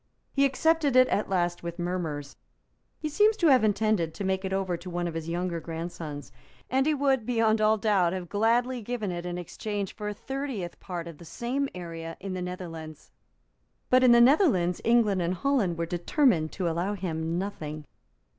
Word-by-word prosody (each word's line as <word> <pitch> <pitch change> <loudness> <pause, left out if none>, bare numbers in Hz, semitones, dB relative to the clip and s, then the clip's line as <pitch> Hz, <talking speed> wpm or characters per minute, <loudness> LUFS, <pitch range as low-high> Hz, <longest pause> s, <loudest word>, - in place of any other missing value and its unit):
He 280 0 +4
accepted 295 0 +2
it 255 0 +7
at 210 - 0
last 175 -2 0
with 170 0 -6
murmurs; 165 -5 -3 0.6
he 310 - -3
seems 420 +8 +3
to 335 -6 +4
have 255 -4 +5
intended 210 -6 +1
to - - -5
make 190 0 0
it 190 - -3
over 190 -2 0
to 175 +2 -8
one 175 0 -2
of 170 - -4
his 165 0 -5
younger 175 0 -2
grandsons; 160 -3 -6 0.4
and 265 +2 +2
he 310 - +3
would 270 -3 +2
beyond 225 -2 +2
all 215 +1 +4
doubt 195 -5 +2
have 185 -1 -4
gladly 235 +5 +1
given 220 -3 -3
it 175 0 -4
in 175 0 -4
exchange 200 +3 -4
for 210 -2 -6
a 210 - -2
thirtieth 265 -7 -5
part 175 -3 -6
of 165 -3 -10
the - - -11
same 255 - -2
area 165 -2 -7
in 195 -1 -5
the 185 - -4
Netherlands. 165 -4 -7 0.8
But 255 0 +6
in 250 - +7
the 235 0 +7
Netherlands 235 - +4
England 225 -5 +3
and 175 +2 0
Holland 215 -8 +1
were 170 - -1
determined 175 - +1
to 185 -2 -2
allow 175 +5 -1
him 165 -3 -2
nothing. 155 -6 -5
190 Hz, 190 wpm, -27 LUFS, 170-240 Hz, 0.8 s, it